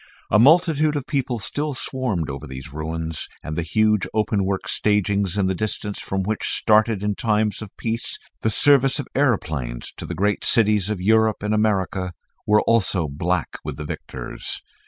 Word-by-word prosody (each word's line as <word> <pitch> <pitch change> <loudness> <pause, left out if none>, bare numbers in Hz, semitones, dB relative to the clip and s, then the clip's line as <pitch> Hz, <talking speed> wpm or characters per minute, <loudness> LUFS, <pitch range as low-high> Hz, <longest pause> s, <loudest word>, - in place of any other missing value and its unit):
A 105 - +5
multitude 155 +2 +4
of 140 -3 -2
people 130 -4 -1
still 145 +6 -2
swarmed 125 - -2
over 70 +2 -6
these 65 0 -9
ruins, 80 +1 -4 0.2
and 80 - -5
the 85 - -1
huge 110 +4 +2
openwork 100 -3 0
stagings 100 -2 +1
in 100 - +2
the 95 - +1
distance 105 +1 -3
from 95 0 -2
which 105 +2 -2
started 110 -2 +3
in 105 0 +1
times 105 0 0
of 110 - -7
peace 115 +1 -2 0.2
the 110 - +1
service 135 +4 +5
of 145 - -3
aeroplanes 75 - -1
to - - -6
the - - -4
various 105 +1 +1
great - - -14
cities 105 -3 +3
of 105 -3 -2
Europe 110 +1 +3
and 105 +1 0
America, 95 -4 0 0.3
were 105 0 +5
also 100 -7 +2
black 85 +5 -2
with 75 -2 -5
the 75 - -6
victors. - - -6
105 Hz, 175 wpm, -22 LUFS, 90-110 Hz, 0.3 s, A